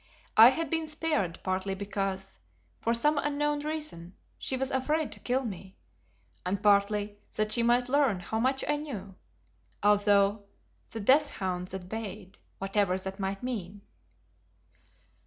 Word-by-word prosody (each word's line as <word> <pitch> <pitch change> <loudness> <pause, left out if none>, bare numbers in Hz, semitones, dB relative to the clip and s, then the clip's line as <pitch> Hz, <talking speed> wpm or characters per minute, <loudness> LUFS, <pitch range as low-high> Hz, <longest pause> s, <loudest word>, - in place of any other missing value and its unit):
I 225 +2 +10
had 325 +5 -2
been 325 -1 0
spared 300 - -1
partly 190 +1 -1
because, 195 -1 -4 0.4
for 230 - 0
some 295 +6 +3
unknown 295 0 0
reason, 295 - -5 0.2
she 260 - -1
was 265 +1 -2
afraid 300 +4 0
to - - -7
kill 255 +1 0
me, 190 -3 -7 0.7
and 190 +3 -2
partly 205 0 +2 0.2
that 215 0 0
she 235 - +3
might 240 +1 +3
learn 270 -7 +2
how 220 +5 -3
much 265 +3 +1
I 295 - +2
knew, 215 -11 -6 0.7
although 205 0 +4 0.4
the 225 - -6
"death 285 +7 +5
hounds 180 -7 -3
had 185 -2 -6
bayed," 200 -2 -7 0.2
whatever 195 -1 +1
that 190 +1 -6
might 195 +1 -3
mean. 205 -6 -4
210 Hz, 140 wpm, -29 LUFS, 195-270 Hz, 0.7 s, I